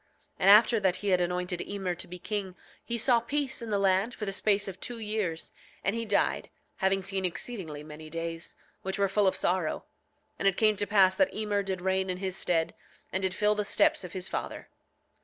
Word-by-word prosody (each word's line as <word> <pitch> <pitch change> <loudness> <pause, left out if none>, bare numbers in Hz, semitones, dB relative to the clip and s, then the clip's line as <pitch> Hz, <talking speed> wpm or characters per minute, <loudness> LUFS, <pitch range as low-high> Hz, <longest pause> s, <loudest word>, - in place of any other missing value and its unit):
9:15 - - -39 0.3
And 195 - +4
after 220 +2 +7
that 190 -3 +2
he 200 +2 -3
had 180 -1 +3
anointed 180 0 -1
Emer 195 -3 -3
to 175 - -6
be 180 +1 -7
king 190 0 -4 0.3
he 235 - -2
saw 235 +1 +5
peace 270 +2 -2
in 230 - -6
the 205 - +1
land 195 +4 +2
for 210 - -4
the 195 - -2
space 200 +1 +1
of 190 -1 -7
two 240 - -5
years, 210 -7 -2 0.3
and 200 +4 0
he 230 0 -2
died, - - +1 0.3
having 190 0 +1
seen 195 0 -1
exceedingly 175 -4 -4
many 155 +1 -10
days, 165 +1 -4 0.3
which 190 +1 -3
were 200 0 +2
full 195 +1 +3
of 190 - +2
sorrow. 175 -3 0 0.6
And 195 - +2
it 195 - +2
came 215 -1 +4
to 205 0 -1
pass 190 -2 +5
that 190 -1 +2
Emer 210 -1 0
did 190 -2 -3
reign 190 0 0
in 180 - 0
his 190 -1 -3
stead, 165 -4 0 0.4
and 190 - 0
did 190 -1 0
fill 210 0 +3
the 210 0 -1
steps 205 - +2
of 180 - -8
his 185 0 -3
father. - - -5
195 Hz, 220 wpm, -29 LUFS, 180-210 Hz, 0.6 s, after